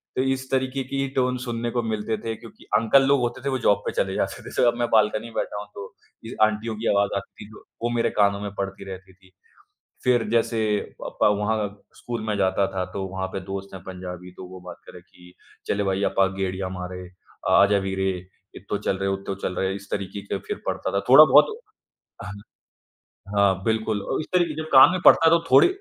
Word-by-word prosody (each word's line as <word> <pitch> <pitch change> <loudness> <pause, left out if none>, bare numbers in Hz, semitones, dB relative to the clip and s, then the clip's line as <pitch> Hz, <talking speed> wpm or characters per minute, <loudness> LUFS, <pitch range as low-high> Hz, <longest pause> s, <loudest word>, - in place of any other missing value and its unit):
तो 130 - +1
इस 130 0 -1
तरीक़े 130 0 0
की 135 +1 -2
टोन 125 -1 +1
सुनने 120 -1 -3
को 120 - 0
मिलते 110 0 -2
थे, 110 +1 -4
क्योंकि 115 +1 -15
अंकल 125 +5 +4
लोग 140 -1 +4
होते 120 +1 -2
थे - - +1
वो 130 - 0
जॉब 100 - +5
पे - - -1
चले - - -1
जाते - - -2
थे। - - -9
तो - - +2
अब 120 - -2
मैं 120 - +1
बालकनी 110 0 +3
में 115 - -13
बैठा - - -2
हूँ, 105 - -10
तो 100 -1 -8 0.3
ये - - -7
आंटियों 110 +1 -2
की 115 - -3
आवाज़ 100 0 +2
आती 100 - -9
थी, 110 - -16 0.3
वो 120 - 0
मेरे 115 - +2
कानों 100 -1 +3
में 100 -1 -4
पड़ती 100 0 -4
रहती 95 0 -9
थी। 95 0 -24 0.7
फिर 120 -2 +3
जैसे 115 0 +1 0.4
प - - -7
अ, - - +7
वहाँ 105 +1 0 0.3
स्कूल 120 -2 -5
मैं 105 -1 -1
जाता 95 0 +2
था 95 - 0
तो 95 0 -4
वहाँ 95 0 -4
पे 95 - -5
दोस्त 95 0 -6
हैं 95 - -8
पंजाबी 90 -1 -8
तो 95 - -8
वो 95 0 -10
बात 90 - -9
करे, 90 - -12
कि 90 0 -19 0.3
"चले 100 0 0
भाई 95 +1 0
अपा 95 -1 +2
गेड़ियाँ 95 -1 -2
मारे, 90 0 -6 0.5
आजा 100 +1 +5
वीरे 95 0 0 0.5
इत्थों 100 +2 -4
चल 95 - +1
रहे, 95 0 -1
उत्थों 95 0 -3
चल 90 - -2
रहे" 95 +1 -1
इस 100 0 -10
तरीक़े 100 0 -4
के 100 - -2
फिर - - -4
पढ़ता - - -2
था, 100 - +1
थोड़ा 150 +4 +10
बहुत 150 - +8 0.8
ह 105 - -6 1.1
हाँ 100 -1 +5
बिल्कुल 110 -2 0
और - - 0
इस - - -8
तरह 170 -4 +2
जब 155 - -3
कान 130 - +10
में 185 - -1
पड़ता 165 - +7
है - - +8
तो 170 - +5
थोड़ी - - +8
105 Hz, 220 wpm, -24 LUFS, 95-120 Hz, 1.1 s, थोड़ा